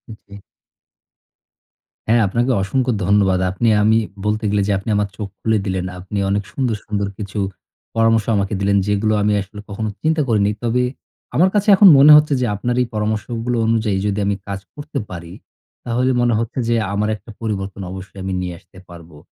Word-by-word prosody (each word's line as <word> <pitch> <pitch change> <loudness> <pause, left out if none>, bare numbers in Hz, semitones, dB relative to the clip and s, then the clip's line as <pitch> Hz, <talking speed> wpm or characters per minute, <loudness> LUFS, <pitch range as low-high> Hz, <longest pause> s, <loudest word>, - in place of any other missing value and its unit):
জি। 100 -1 -14 1.7
হ্যাঁ, 115 +1 +4
আপনাকে 120 +6 0
অসংখ্য 125 +6 0
ধন্যবাদ। 95 -1 +3
আপনি 95 +5 -1 0.2
আমি 110 +1 +4 0.3
বলতে 105 +1 0
গেলে 105 0 +1
যে - - +1
আপনি 100 +3 -6
আমার 105 0 +1
চোখ 105 - -4
খুলে 110 -1 +1
দিলেন। 95 -2 -2
আপনি 95 +3 -6
অনেক 100 +1 0
সুন্দর, 125 -5 -1
সুন্দর 100 -1 -2
কিছু 105 0 -5 0.6
পরামর্শ 115 -1 +3
আমাকে 100 +1 -1
দিলেন, 100 0 +2
যেগুলো 105 +1 +1
আমি 105 0 +2
আসলে 100 +2 -10
কখনো 110 +2 -3
চিন্তা 160 0 +1
করিনি। 105 -2 +2
তবে 120 +1 +1 0.5
আমার 180 +6 +4
কাছে 205 0 +1
এখন 195 +1 +7
মনে 150 +2 +8
হচ্ছে 150 -1 +3
যে, - - +2
আপনার 120 +4 -2
এই 125 - 0
পরামর্শগুলো 110 +3 -2
অনুযায়ী 110 -3 +1
যদি 100 0 -1
আমি 100 0 +1
কাজ 100 -1 -4
করতে 145 0 -5
পারি, 85 -2 -8 0.5
তাহলে 125 +2 +1
মনে 120 -1 +2
হচ্ছে 115 +3 -3
যে 120 - +3 0.2
আমার 105 +1 0
একটা 110 - -16
পরিবর্তন 100 -3 -4
অবশ্যই 95 +1 -9
আমি 95 - -3
নিয়ে 90 -1 -4
আসতে - - -21
পারবো। 85 -3 -13
105 Hz, 175 wpm, -19 LUFS, 100-120 Hz, 1.7 s, মনে